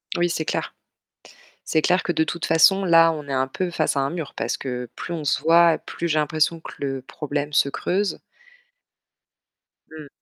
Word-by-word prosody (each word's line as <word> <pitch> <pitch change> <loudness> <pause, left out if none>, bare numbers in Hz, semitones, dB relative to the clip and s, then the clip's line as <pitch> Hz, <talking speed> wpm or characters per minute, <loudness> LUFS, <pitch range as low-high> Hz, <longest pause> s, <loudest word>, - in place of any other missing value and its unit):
Oui, 175 0 +1
c'est 160 -2 -2
clair. - - -3 0.9
C'est 155 - +1
clair 180 +3 +2
que 175 - -1
de 160 - +1
toute 170 +1 -4
façon, 195 +4 +4
là, 165 -2 +5
on 150 -3 -7
est - - -4
un 130 0 +1
peu 180 +7 -3
face 155 -4 -1
à - - +2
un 135 0 -1
mur, 165 -4 -6
parce - - -2
que 125 -2 -5
plus 175 - -6
on 160 -3 -4
se 145 - +1
voit, 165 0 +5
plus 170 - -5
j'ai 155 -1 +1
l'impression 155 +2 0
que - - -10
le 135 -2 -3
problème 145 +2 -4
se 140 - +3
creuse. 190 +8 -2 1.7
Mmh. 155 -2 -10
160 Hz, 195 wpm, -23 LUFS, 145-170 Hz, 1.7 s, là